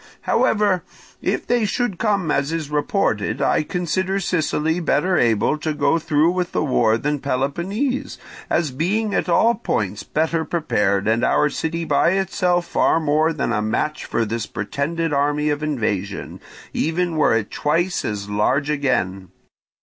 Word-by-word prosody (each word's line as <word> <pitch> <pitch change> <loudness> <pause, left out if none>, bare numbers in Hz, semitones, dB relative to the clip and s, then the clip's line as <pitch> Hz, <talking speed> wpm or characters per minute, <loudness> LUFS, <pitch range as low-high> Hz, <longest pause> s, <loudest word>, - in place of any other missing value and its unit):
"However, 205 -5 +2 0.4
if - - -1
they 240 -1 +1
should 210 -2 -1
come 200 -8 +1
as 140 +2 0
is 160 -3 -3
reported, 150 - 0
I - - +2
consider 185 +4 -1
Sicily 160 -2 0
better 180 +2 +1
able 120 +2 +2
to 155 0 -2
go 145 +3 +2
through 155 +2 +2
with 180 -1 -2
the - - +1
war 115 -6 +2
than 145 +4 -1
Peloponnese, 185 - -2 0.3
as 155 -5 +1
being 205 +10 -1
at 190 - 0
all 225 +7 +4
points 105 - -2
better 160 +1 -1
prepared, 105 - 0
and 115 +1 +2
our 150 - +3
city 165 +3 -3
by 170 - +3
itself 180 -2 +1
far 165 - +2
more 155 +1 +2
than 140 -6 -1
a 105 - 0
match 150 +8 -2
for 115 - 0
this 115 +1 -3
pretended 150 +9 -2
army 145 +1 +1
of 145 0 -2
invasion, 105 -10 -3 0.3
even 165 +1 0
were 155 -7 +3
it 110 -2 -4
twice 170 +5 0
as 100 -1 -3
large 130 +8 +1
again. 100 - -1
155 Hz, 155 wpm, -21 LUFS, 130-175 Hz, 0.4 s, all